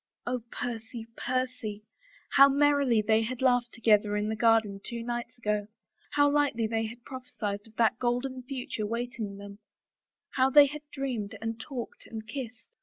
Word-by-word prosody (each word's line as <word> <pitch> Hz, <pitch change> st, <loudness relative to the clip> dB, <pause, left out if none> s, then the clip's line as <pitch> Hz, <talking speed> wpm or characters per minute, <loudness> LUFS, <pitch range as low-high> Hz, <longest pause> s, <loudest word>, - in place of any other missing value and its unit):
Oh, 245 Hz, 0 st, -1 dB
Percy, 230 Hz, -1 st, -5 dB
Percy 255 Hz, -5 st, -2 dB
I 220 Hz, -, -47 dB, 0.4 s
How 275 Hz, +1 st, +10 dB
merrily 280 Hz, -5 st, +3 dB
they 220 Hz, +1 st, +3 dB
had 235 Hz, +2 st, -3 dB
laughed 245 Hz, -2 st, +3 dB
together 210 Hz, -2 st, +3 dB
in 210 Hz, +1 st, -1 dB
the 220 Hz, -, -1 dB
garden 220 Hz, -3 st, +3 dB
two 235 Hz, -1 st, -5 dB
nights 240 Hz, +1 st, -4 dB
ago, 210 Hz, -3 st, -1 dB, 0.5 s
how 290 Hz, 0 st, +5 dB
lightly 285 Hz, -6 st, +2 dB
they 225 Hz, 0 st, 0 dB
had 235 Hz, +2 st, -11 dB
prophesied 225 Hz, -6 st, -5 dB
of 220 Hz, -, -20 dB
that 225 Hz, 0 st, +2 dB
golden 250 Hz, +2 st, -1 dB
future 250 Hz, -5 st, -4 dB
waiting 230 Hz, -3 st, -4 dB
them, 200 Hz, 0 st, -10 dB, 0.7 s
how 260 Hz, 0 st, +3 dB
they 290 Hz, +2 st, +9 dB
had 295 Hz, +2 st, -5 dB
dreamed 250 Hz, -8 st, -3 dB
and 225 Hz, 0 st, -4 dB
talked 250 Hz, -1 st, -7 dB
and 220 Hz, -1 st, -7 dB
kissed 255 Hz, -, -8 dB
235 Hz, 165 wpm, -29 LUFS, 220-255 Hz, 0.7 s, How